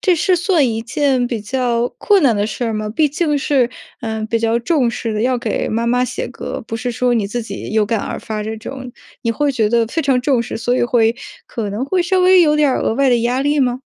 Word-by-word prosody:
这 365 -3 +3
是 365 +3 +2
算 345 -6 +2
一 225 0 -2
件 260 +1 +1
比 230 -4 -3
较 240 +1 0
困 400 -8 +3
难 235 -4 +4
的 205 - 0
事 220 +3 -3
儿 225 - -1
吗？ 215 0 -3
毕 300 +6 +2
竟 300 0 0
是， 265 -4 +1 0.3
嗯， 220 -1 -3
比 230 - 0
较 230 +1 +1
重 245 -1 +1
视 225 -2 -4
的， 210 - -1
要 250 +1 +1
给 230 -3 -2
妈 230 +2 -1
妈 250 +1 +2
写 475 - -4
歌， - - -6
不 225 - -4
是 245 +2 -3
说 245 +1 +1
你 220 -3 +1
自 240 +3 -3
己 225 - -7
有 215 -1 +2
感 225 -1 0
而 - - -4
发 215 -1 -4
这 220 +1 -4
种， 255 +3 -8 0.3
你 230 - 0
会 285 +4 0
觉 220 -4 +1
得 230 0 +2
非 315 +8 -2
常 265 -3 +2
重 255 -3 +1
视， - - -5
所 240 +2 0
以 - - +1
会， 235 -1 +2 0.3
可 215 -4 -4
能 220 +6 -2
会 360 +5 +1
稍 370 +2 +1
微 365 0 +6
有 300 -1 +3
点 300 -2 +3
儿 260 - 0
额 - - 0
外 275 +2 +2
的 240 -1 +3
压 245 +3 0
力 290 +1 +1
吗？ 250 -1 0
245 Hz, 280 characters per minute, -18 LUFS, 225-280 Hz, 0.3 s, 微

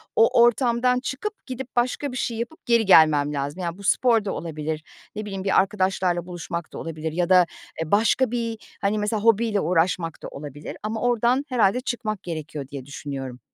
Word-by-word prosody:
o 230 +1 +5
ortamdan 240 +1 +3
çıkıp 355 +12 -5
gidip 260 -1 -6
başka 250 +3 0
bir 250 - -5
şey 230 -2 -2
yapıp 240 +8 -6
geri 235 -2 +3
gelmem 150 -5 +6
lazım. 145 +5 -3
Yani, 170 +2 -3
bu 200 - -12
spor 225 +1 +3
da 195 - -1
olabilir, 155 -1 -4 0.3
ne 215 - -4
bileyim 195 -2 -5
bir 195 - +4
arkadaşlarla 190 -3 0
buluşmak 175 -1 -6
da - - -6
olabilir 160 -1 -4
ya 175 +2 -1
da, 180 -1 +7 0.4
eee, 160 - -4
başka 230 +4 +3
bir, 230 -2 -2 0.2
hani, 200 +2 +1
mesela 210 0 -1
hobiyle 225 -2 +3
uğraşmak 165 -2 0
da - - -4
olabilir 145 0 -8
ama 220 +1 -3
oradan 245 +3 +2
herhâlde 245 -1 +2
çıkmak 220 -5 -3
gerekiyor 155 -4 -5
diye 140 -2 -8
düşünüyorum. 135 -3 -6
195 Hz, 180 wpm, -24 LUFS, 160-235 Hz, 0.4 s, da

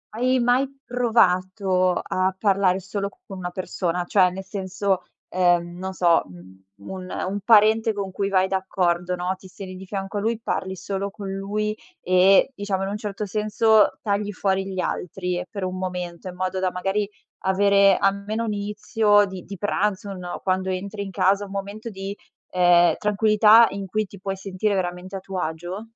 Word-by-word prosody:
hai 255 +2 +2
mai 245 +3 +3 0.2
provato 190 -6 +2
a 185 +1 0
parlare 195 -2 +2
solo 195 +2 -4 0.2
con 195 - -8
una 180 - -4
persona? 180 -1 -2
Cioè 185 0 +4
nel 190 +1 -6
senso, 190 0 -2 0.3
ehm, 175 -1 +1
non 190 0 -4
so, 170 -3 +3
mhmm, 95 +1 -15 0.3
un 185 -1 -7 0.2
un 200 - -3
parente 220 +1 +5
con 200 -2 -4
cui 195 +1 -2
vai 190 -1 +3
d'accordo, 180 -2 0
no, 180 +1 -1
ti 190 - -14
stendi 185 0 -9
di 190 - -9
fianco 195 +1 -4
a - - +1
lui, 225 +1 -1
parli 190 -4 -3
solo 195 +2 -3
con 195 -1 -8
lui 210 +2 -2 0.3
e 185 +7 +5
diciamo 200 -1 -2
in 195 - -2
un 205 - -3
certo 210 -1 -4
senso 215 +1 +3
tagli 205 -1 -1
fuori 190 0 0
gli 190 -1 -5
altri 180 0 -3
per 200 - -5
un 185 0 -3
momento 180 -1 -5
in 180 - -7
modo 185 +1 -2
da, 185 - +1
magari, 195 +3 -1 0.4
avere 200 0 +4
almeno 200 +3 0
un 215 - -1
inizio 205 0 +2
di 190 -2 -8
di 200 - -8
pranzo, 205 0 -1
un 195 - -6
no, 180 -1 -6
quando 190 0 0
entri 200 +2 -4
in 195 - -7
casa 195 +2 +2
un 195 - -12
momento 200 +3 -5
di, 195 -1 -6 0.4
ehm, 175 -1 +5
tranquillità 215 +2 +5
in 200 0 -5
cui 215 +3 -1
ti 200 - -13
puoi 195 0 -3
sentire 195 +2 -1
veramente 180 +1 -3
a - - -3
tuo 190 0 -5
agio? 175 +4 -4
195 Hz, 180 wpm, -23 LUFS, 185-205 Hz, 0.4 s, parente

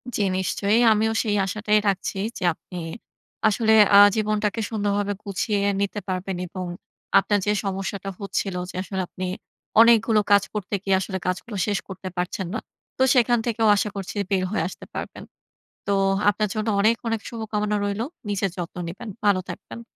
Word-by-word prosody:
জ্বী 205 - +1
নিশ্চয়ই। 200 +3 +1
আমিও 220 +1 +1
সেই 210 -2 0
আশাটাই 210 +2 +1
রাখছি 195 0 -1 0.2
যে - - -6
আপনি 180 +3 -11 0.7
আসলে 220 +1 +3 0.2
আ - - +11 0.2
জীবনটাকে 215 0 0
সুন্দরভাবে 205 -2 0
গুছিয়ে 205 +1 -1 0.2
নিতে 200 +1 -1
পারবেন 185 0 -3
এবং 185 +1 -6 0.5
আপনার 205 -1 +1
যে 205 - +2
সমস্যাটা 195 0 -3
হচ্ছিলো 195 -2 -2
যে, - - -15
আসলে 190 -1 -3
আপনি 185 - -6 0.6
অনেকগুলো 225 -1 +5
কাজ 200 -1 +6
করতে 210 -1 -3
গিয়ে 195 -1 +3
আসলে 190 0 -3
কাজগুলো 195 +4 -3
শেষ 205 -3 +1
করতে 190 0 -8
পারছেন 180 +1 -2
না। - - -1 0.4
তো 260 - +3
সেখান 240 -1 +4
থেকেও 225 -2 +1
আশা 205 +1 0
করছি 195 0 -5 0.2
বের 190 -1 +2
হয়ে 215 - 0
আসতে - - -10
পারবেন। - - -6 0.6
তো 200 - +1 0.4
আপনার 210 +1 -1
জন্য 215 0 -2
অনেক, 220 +3 +4
অনেক 225 -1 -1
শুভকামনা 210 -2 -2
রইলো। 205 +3 -1 0.2
নিজের 200 -1 0
যত্ন 175 -1 -6
নিবেন, 185 +7 -8 0.2
ভালো 200 -2 +4
থাকবেন। 235 - -8
205 Hz, 160 wpm, -24 LUFS, 190-215 Hz, 0.7 s, আ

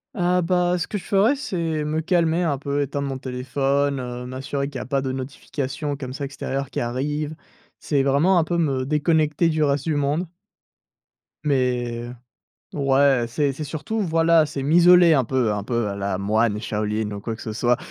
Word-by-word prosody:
Ah 180 -2 +2
bah, 180 +1 +1
ce 175 - -3
que 210 - -3
je 190 - -9
ferais, 215 +8 +3
c'est 165 - -2
me 155 +1 -1
calmer 170 0 +1
un 145 -5 0
peu, 140 +1 -2
éteindre 140 0 -2
mon 135 -1 -3
téléphone, 135 +2 -1
heu, 125 0 -6
m'assurer 135 +2 -3
qu'il 140 - -11
y 125 - -3
a - - -6
pas 135 +1 0
de 130 -1 -3
notifications, 140 +2 -4
comme 135 -3 -6
ça, 140 +2 -4
extérieures 135 0 -4
qui - - -3
arrivent. 145 +5 -2 0.5
C'est 140 -3 0
vraiment 145 +8 +3
un 170 - +4
peu 170 +2 -2
me 135 -6 0
déconnecter 155 +2 +2
du 155 -1 +1
reste 140 -1 +1
du 160 -2 0
monde 145 +5 0 1.2
mais, 125 -4 0 0.7
ouais, 135 -3 +3
c'est 140 +4 0
c'est 155 - -6
surtout, 155 +9 -4
voilà, 165 -2 +3
c'est 135 - -4
m'isoler 175 +3 +6
un 135 -4 +3
peu 120 -3 0
un 105 -1 -3
peu 115 0 -1
à 100 - -4
la 100 -1 -2
moine 105 +2 +1
Shaolin 105 -1 -2
ou 100 -1 -6
quoi 115 +2 -4
que 110 - -12
ce 110 - -5
soit. 120 +2 +2
140 Hz, 195 wpm, -23 LUFS, 125-160 Hz, 1.2 s, m'isoler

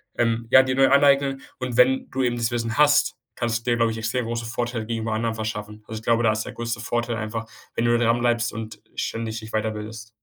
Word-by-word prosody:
ähm 115 -1 +1
ja, 130 - +9
dir 130 0 -1
neu 135 0 +5
aneignen. 140 -1 +4 0.2
Und 130 -2 -4
wenn 130 +1 +4
du 135 - -1
eben 120 -1 +1
das 115 0 0
Wissen 115 0 -2
hast, 145 0 +4 0.2
kannst 115 -1 -2
du 125 - +1
dir, 120 - +2
glaube 115 -1 +2
ich, 110 - -5
extrem 115 +2 -1
große 115 0 -3
Vorteile 120 -1 -3
gegenüber 115 -1 -2
anderen 115 +1 0
verschaffen. 105 -1 -5
Also, 110 - -6
ich - - -17
glaube, 115 0 +3
da 110 - +4
ist 110 0 -2
der - - -6
größte 120 0 -4
Vorteil 120 0 -1
einfach, 115 +1 -4 0.3
wenn 115 - 0
du 120 0 +4
dranbleibst 120 0 +1
und 110 -2 -7 0.2
ständig 115 -1 -3
dich 110 0 -10
weiterbildest. 110 +1 -3
115 Hz, 230 wpm, -24 LUFS, 110-120 Hz, 0.3 s, ja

